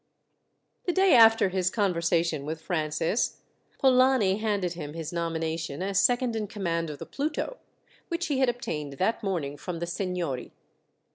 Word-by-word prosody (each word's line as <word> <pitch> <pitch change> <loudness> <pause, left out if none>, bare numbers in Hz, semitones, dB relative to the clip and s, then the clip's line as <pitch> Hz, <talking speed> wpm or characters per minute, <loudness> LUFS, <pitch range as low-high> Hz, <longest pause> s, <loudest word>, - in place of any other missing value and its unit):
The 355 - +1
day 380 0 +4
after 225 -4 +7
his 185 -1 +1
conversation 170 -6 +1
with 155 +2 -4
Francis, 160 +4 -1 0.4
Polani 255 -7 +4
handed 205 -5 -1
him 150 -3 -7
his 165 0 -5
nomination 165 -2 -2
as 195 0 +2
second 245 -1 +2
in 215 -2 -2
command 170 -5 -2
of 150 - -6
the - - -7
Pluto, 305 - -3 0.5
which 345 0 -2
he 280 -3 0
had 260 -2 +4
obtained 150 - -4
that 190 +11 0
morning 165 -9 -2
from 175 +4 -5
the 170 - -3
seignory. 175 -7 -3
180 Hz, 150 wpm, -27 LUFS, 165-225 Hz, 0.5 s, after